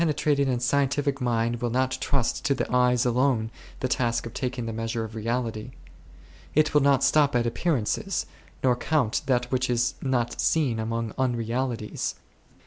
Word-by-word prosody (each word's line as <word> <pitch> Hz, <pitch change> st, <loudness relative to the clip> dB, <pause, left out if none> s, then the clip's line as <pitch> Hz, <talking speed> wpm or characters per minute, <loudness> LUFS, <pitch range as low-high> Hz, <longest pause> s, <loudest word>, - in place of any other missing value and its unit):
A 155 Hz, -3 st, +2 dB
trating 140 Hz, -2 st, +1 dB
and 125 Hz, -2 st, -1 dB
scientific 140 Hz, +1 st, +1 dB
mind 120 Hz, -1 st, 0 dB
will 120 Hz, -, 0 dB
not 130 Hz, +2 st, +1 dB
trust 135 Hz, -4 st, 0 dB
to 140 Hz, -, +2 dB
the -, -, -1 dB
eyes 125 Hz, 0 st, +3 dB
alone 125 Hz, -2 st, +1 dB, 0.3 s
the 130 Hz, -, +1 dB
task 120 Hz, -2 st, 0 dB
of 115 Hz, -, -7 dB
taking 125 Hz, -3 st, -3 dB
the 115 Hz, -, -4 dB
measure 115 Hz, +1 st, -2 dB
of 110 Hz, 0 st, -7 dB
reality; 115 Hz, +1 st, -3 dB, 0.8 s
it 155 Hz, +1 st, +3 dB
will 150 Hz, -, +5 dB
not 140 Hz, -1 st, +3 dB
stop 145 Hz, -3 st, +4 dB
at 120 Hz, -1 st, +2 dB
appearances, 120 Hz, -2 st, -1 dB, 0.4 s
nor 125 Hz, -2 st, +4 dB
count 130 Hz, -3 st, 0 dB
that 125 Hz, -2 st, +1 dB
which 130 Hz, -1 st, 0 dB
is 120 Hz, +1 st, +1 dB
not 125 Hz, -3 st, -1 dB
seen 135 Hz, -8 st, +1 dB
amongst 115 Hz, 0 st, -2 dB
unrealities. 120 Hz, -2 st, -1 dB
125 Hz, 165 wpm, -26 LUFS, 115-135 Hz, 0.8 s, will